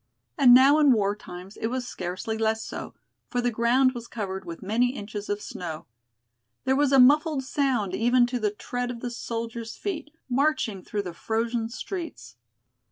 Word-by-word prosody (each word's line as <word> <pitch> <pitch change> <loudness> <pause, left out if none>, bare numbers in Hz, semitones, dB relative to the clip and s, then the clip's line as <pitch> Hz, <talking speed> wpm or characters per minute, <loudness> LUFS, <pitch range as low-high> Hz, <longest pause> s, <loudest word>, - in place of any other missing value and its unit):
And 255 -6 +8
now 275 +4 +7
in 290 -4 +6
war 205 -2 +1
times 185 -1 -10
it 225 - -2
was 250 +1 -3
scarcely 185 +4 -4
less 220 0 0
so, - - -7 0.3
for 245 - -1
the 245 0 +1
ground 240 +3 +3
was 235 -2 -7
covered 190 -5 -5
with 170 +1 -8
many 240 +6 +1
inches 205 -1 -6
of 205 0 -2
snow. 165 -3 -6 0.8
There 265 - +2
was 285 0 +2
a 275 - +6
muffled 290 +2 +5
sound 260 -8 0
even 240 +3 +4
to 245 0 -2
the 215 -2 +1
tread 245 +4 -4
of 235 -1 -6
the 245 - -4
soldiers' 230 -1 -5
feet, 320 -7 -4 0.2
marching 260 -6 +1
through 205 -1 -3
the 180 -3 -6
frozen 225 +4 -1
streets. 240 - -6
235 Hz, 175 wpm, -26 LUFS, 210-260 Hz, 0.8 s, And